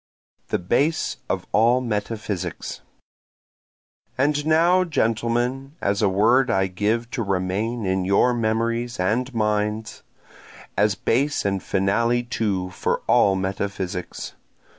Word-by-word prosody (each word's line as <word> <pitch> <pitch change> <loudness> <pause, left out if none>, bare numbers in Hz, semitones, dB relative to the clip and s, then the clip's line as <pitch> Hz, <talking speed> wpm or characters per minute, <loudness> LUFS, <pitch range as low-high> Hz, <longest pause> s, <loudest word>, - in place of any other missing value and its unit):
The - - 0
Base 140 - 0
of - - -2
All 115 +4 +4
Metaphysics 105 -6 -4 1.4
And 145 +2 +1
now 170 +4 +4
gentlemen, 120 -1 -1
A 100 0 +1
word 115 +7 +3
I 95 0 +2
give 105 +5 -1
to 125 - -2
remain 100 +4 -1
in 95 0 0
your 100 +6 +3
memories 115 +1 -1
and 115 +8 0
minds, 105 -1 -1 0.7
As 105 -1 +2
base 145 -2 0
and 100 -1 0
finale 115 +5 +1
too 100 -6 -2
for - - -2
all 95 - +4
metaphysics. 95 -1 -4
110 Hz, 110 wpm, -23 LUFS, 100-120 Hz, 1.4 s, All